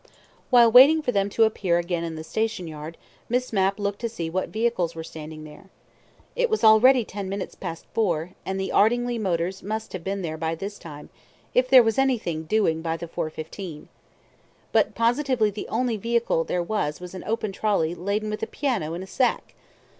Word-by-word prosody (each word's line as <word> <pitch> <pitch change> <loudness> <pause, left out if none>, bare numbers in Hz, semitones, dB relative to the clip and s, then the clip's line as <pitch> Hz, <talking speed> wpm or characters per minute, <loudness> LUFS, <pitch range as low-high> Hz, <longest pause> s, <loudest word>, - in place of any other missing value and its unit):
While 240 -3 +6
waiting 285 +6 +8
for 250 - 0
them 200 -2 +1
to 225 +3 +3
appear 195 -5 +1
again 175 -1 -2
in 165 -1 -4
the 155 - -6
station 220 0 -2
yard, 155 +1 -8 0.3
Miss 250 0 -1
Mapp 195 -1 +2
looked 205 -1 -3
to 235 - -1
see 170 -8 -5
what 185 +2 -2
vehicles 215 -7 -1
were 160 - -5
standing 155 -1 -9
there. 155 +6 -13 0.7
It - - +1
was 440 - -1
already 230 +3 +6
ten 200 -1 -6
minutes 195 0 -4
past 165 0 -7
four, 175 -6 0
and 190 0 -3
the 190 - -2
Ardingly 240 +2 +2
motors 185 -2 -1
must 220 +2 -5
have 185 -3 -5
been 195 +1 -3
there 160 -2 -4
by 160 +1 -2
this 200 +4 -7
time, 150 -3 -10 0.4
if 255 0 +3
there 255 -2 +8
was 225 +2 0
anything 215 -12 0
"doing" 160 -4 +1
by 165 0 -2
the 170 - -7
4.15. 160 +1 -6 0.8
But - - +2
positively 240 -2 +2
the 205 - -6
only 235 0 -1
vehicle 230 -6 0
there 180 -1 -1
was 160 -6 -2
an 185 - -7
open 215 -1 -2
trolly 195 -5 0
laden 200 +5 -2
with 215 - -4
a - - -2
piano 215 - -2
in 180 - -5
a - - -10
sack. 255 +5 0
200 Hz, 190 wpm, -25 LUFS, 165-230 Hz, 0.8 s, waiting